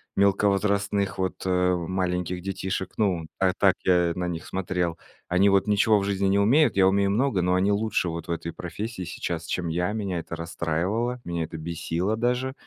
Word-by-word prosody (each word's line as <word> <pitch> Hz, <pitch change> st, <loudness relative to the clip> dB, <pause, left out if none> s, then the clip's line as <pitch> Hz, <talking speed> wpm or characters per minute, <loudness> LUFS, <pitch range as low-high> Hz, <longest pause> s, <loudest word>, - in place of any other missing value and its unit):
мелковозрастных, 100 Hz, 0 st, +1 dB
вот, 95 Hz, -1 st, -1 dB
э, 90 Hz, 0 st, +2 dB
маленьких 90 Hz, 0 st, -2 dB
детишек. 95 Hz, 0 st, -3 dB
Ну, 90 Hz, -7 st, 0 dB
а 95 Hz, -1 st, +3 dB
так -, -, +4 dB
я 90 Hz, -2 st, +3 dB
на 90 Hz, 0 st, -2 dB
них 80 Hz, -2 st, -5 dB
смотрел. 90 Hz, -3 st, -2 dB, 0.3 s
Они 95 Hz, +3 st, +4 dB
вот 100 Hz, +2 st, +3 dB
ничего 105 Hz, +1 st, +4 dB
в 100 Hz, -, -2 dB
жизни 100 Hz, -1 st, 0 dB
не 100 Hz, +1 st, +3 dB
умеют, 135 Hz, +10 st, +4 dB
я 95 Hz, -1 st, +6 dB
умею 100 Hz, 0 st, +2 dB
много, 115 Hz, -2 st, +1 dB
но 90 Hz, +1 st, +2 dB
они 95 Hz, +2 st, +2 dB
лучше 110 Hz, -3 st, 0 dB
вот 85 Hz, 0 st, -5 dB
в -, -, -3 dB
этой 85 Hz, 0 st, -4 dB
профессии 100 Hz, +4 st, -5 dB
сейчас, 85 Hz, -1 st, -4 dB
чем 85 Hz, 0 st, -2 dB
я. 90 Hz, +4 st, 0 dB
Меня 100 Hz, -5 st, -2 dB
это 85 Hz, -, -6 dB
расстраивало, 85 Hz, +9 st, -2 dB
меня 85 Hz, -1 st, -2 dB
это 80 Hz, +1 st, -6 dB
бесило 85 Hz, +5 st, -2 dB
даже. 125 Hz, +2 st, 0 dB
95 Hz, 185 wpm, -25 LUFS, 85-100 Hz, 0.3 s, я